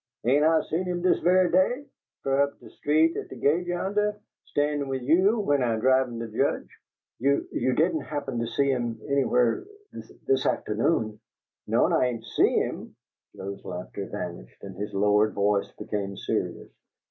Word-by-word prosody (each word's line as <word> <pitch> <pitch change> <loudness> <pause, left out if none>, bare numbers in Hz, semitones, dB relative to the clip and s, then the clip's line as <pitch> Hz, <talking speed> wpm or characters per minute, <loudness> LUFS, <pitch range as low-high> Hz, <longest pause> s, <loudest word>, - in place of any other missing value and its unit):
"Ain' 140 +5 +4
I 160 0 +4
seen 175 +4 -2
him 180 -1 -3
dis 185 - +3
ve'y 180 0 +3
day, 245 +10 +2 0.4
fur 135 0 +2
up 140 0 -1
de - - -14
street 155 +3 +2
at - - -5
de - - -8
gate 170 +5 +1
yonnah, 205 +4 0 0.3
stan'in' 145 -1 -1
'ith 130 -1 -3
you, 170 +9 +4
w'en 145 -8 +1
I 120 -2 +1
drivin' 130 +1 +2
de 115 0 -4
Judge?" 110 - -1 0.5
"You 140 +3 +1
you 130 - 0
didn't 160 +1 +2
happen 140 -4 -4
to 115 - -1
see 140 +4 +1
him 120 -3 -2
anywhere 125 -4 +2 0.3
this - - -10
this 405 -1 +2
afternoon?" 110 -9 0 0.5
"No'm, - - +2
I 125 - +3
ain' 115 -2 -4
SEE 110 - +3
him." - - -5 0.4
Sam's 100 +1 -7
laughter 90 +2 -6
vanished 85 -12 -7
and 95 -2 -8
his 105 +2 -5
lowered 105 +2 +3
voice 100 0 +1
became 100 -2 -4
serious. - - -3
135 Hz, 170 wpm, -26 LUFS, 110-160 Hz, 0.5 s, Ain